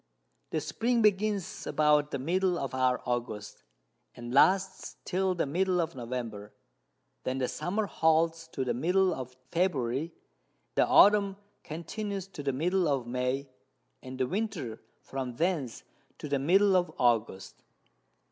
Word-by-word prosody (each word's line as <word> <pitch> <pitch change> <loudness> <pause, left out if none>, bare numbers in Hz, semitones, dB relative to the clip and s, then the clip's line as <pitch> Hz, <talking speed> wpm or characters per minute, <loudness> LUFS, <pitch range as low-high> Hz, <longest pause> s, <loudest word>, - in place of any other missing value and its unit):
_] - - -48 0.5
The 160 - -1
Spring 235 +7 0
begins 205 -2 +1
about 150 -1 +3
the 140 - -3
Middle 180 +6 +1
of 135 -4 -4
our 130 -1 +1
August, 120 -4 -4 0.5
and 120 0 -7
lasts 190 +6 +3
till 185 0 0
the 170 - 0
Middle 180 +5 +1
of 165 -1 -1
November; 115 -4 -5 0.7
then 130 +1 -2
the 130 -1 0
Summer 205 +10 -2
holds 165 -1 +1
to 135 -5 -4
the 120 - 0
Middle 180 +8 +2
of 130 -3 -7
February, 155 -4 0 0.6
the - - +3
Autumn 200 -1 +5 0.3
continues 195 +5 -5
to 165 - -8
the 140 -1 0
Middle 175 +6 +1
of 135 -4 0
May, 125 +3 -2 0.5
and 130 0 -8
the 130 - +1
Winter 180 - -3 0.2
from 130 -3 -5
thence 160 -6 -1 0.3
to - - -6
the 140 -1 0
Middle 190 +7 +4
of 180 -1 +2
August. 115 -6 0
155 Hz, 145 wpm, -29 LUFS, 130-185 Hz, 0.7 s, Autumn